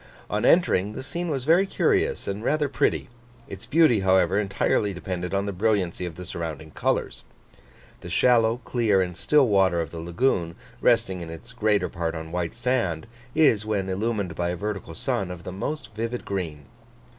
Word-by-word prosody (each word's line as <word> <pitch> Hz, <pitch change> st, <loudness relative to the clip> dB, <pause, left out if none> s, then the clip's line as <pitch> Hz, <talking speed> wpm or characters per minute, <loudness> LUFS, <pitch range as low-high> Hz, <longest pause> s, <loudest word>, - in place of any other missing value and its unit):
On 105 Hz, +1 st, 0 dB
entering, 105 Hz, -, +3 dB
the -, -, -6 dB
scene 170 Hz, +5 st, -4 dB
was 135 Hz, -4 st, -2 dB
very 170 Hz, +7 st, +4 dB
curious -, -, +1 dB
and 100 Hz, +2 st, -3 dB
rather 150 Hz, +2 st, +1 dB
pretty; 140 Hz, -, 0 dB, 0.4 s
its 95 Hz, -, -9 dB
beauty, 155 Hz, -8 st, +4 dB
however, 95 Hz, 0 st, +3 dB
entirely 100 Hz, 0 st, 0 dB
depended 90 Hz, 0 st, -4 dB
on 100 Hz, 0 st, 0 dB
the 100 Hz, -, -2 dB
brilliancy 95 Hz, -3 st, 0 dB
of 85 Hz, -, -8 dB
the 90 Hz, -, -8 dB
surrounding 80 Hz, -2 st, -6 dB
colours. -, -, -1 dB, 0.8 s
The -, -, -9 dB
shallow, 120 Hz, -1 st, +3 dB
clear, 110 Hz, -6 st, +2 dB
and 90 Hz, -2 st, -1 dB
still 145 Hz, -, +3 dB
water 95 Hz, -4 st, +3 dB
of 80 Hz, -3 st, -3 dB
the 85 Hz, -, -6 dB
lagoon, 85 Hz, 0 st, 0 dB, 0.3 s
resting 95 Hz, -2 st, +2 dB
in 85 Hz, -, -7 dB
its 100 Hz, +10 st, -10 dB
greater 110 Hz, -3 st, +1 dB
part 85 Hz, -1 st, -3 dB
on 80 Hz, 0 st, -6 dB
white 90 Hz, +3 st, -2 dB
sand, 120 Hz, -10 st, 0 dB, 0.3 s
is, 115 Hz, -10 st, +4 dB
when 100 Hz, -3 st, -1 dB
illumined 100 Hz, -2 st, -1 dB
by 85 Hz, +2 st, -1 dB
a 90 Hz, -, -1 dB
vertical 100 Hz, -3 st, -5 dB
sun, 95 Hz, +3 st, -1 dB
of 90 Hz, -1 st, -8 dB
the -, -, -6 dB
most 115 Hz, +7 st, -5 dB
vivid 115 Hz, +3 st, -4 dB
green. 80 Hz, -7 st, -4 dB
100 Hz, 180 wpm, -25 LUFS, 90-115 Hz, 0.8 s, very